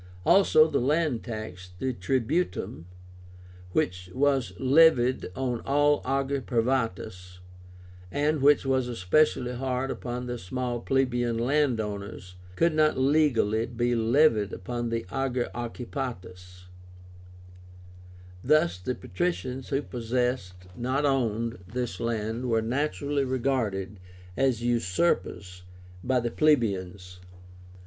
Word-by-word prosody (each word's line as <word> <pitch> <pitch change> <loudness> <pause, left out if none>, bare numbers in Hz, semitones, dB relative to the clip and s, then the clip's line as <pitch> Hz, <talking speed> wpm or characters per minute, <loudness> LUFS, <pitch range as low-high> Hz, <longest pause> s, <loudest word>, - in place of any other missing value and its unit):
Also 160 -5 +6
the - - 0
land 145 -2 +1
tax 110 -6 -7
(TRIBÚTUM), 130 - -1 0.9
which 90 0 -1
was 135 -2 +2
levied 130 -2 +4
on 125 -3 -2
all 145 +1 +3
ager 135 +1 0
privátus, 115 -8 -2 0.7
and 150 +3 0
which 145 0 +5
was 130 -2 +1
especially 125 +4 +1
hard 130 +1 -2
upon 125 0 -5
the 120 -1 -4
small 120 +5 -3
plebeian 120 -2 0
land 130 0 +1
owners, 100 -3 -6 0.2
could 170 - +2
not 155 0 +3
legally 130 -6 +2
be 120 +1 -1
levied 115 -3 +3
upon 120 +4 -4
the 115 -2 -2
ager 130 -2 -1
occupátus. 115 -7 -6 1.8
Thus 125 - +3
the 125 +8 -3
patricians 135 -8 -3
who 140 0 0
possessed, 120 -7 -2
not 130 +5 -1
owned, 115 -4 0
this 120 -2 -4
land 115 +2 -2
were 115 -1 +2
naturally 140 +3 -1
regarded 115 -7 -1 0.4
as 130 -2 +1
usurpers 100 - 0 0.4
by 130 0 +2
the 120 -1 -2
plebeians. 95 -11 0
125 Hz, 105 wpm, -27 LUFS, 110-135 Hz, 1.8 s, Also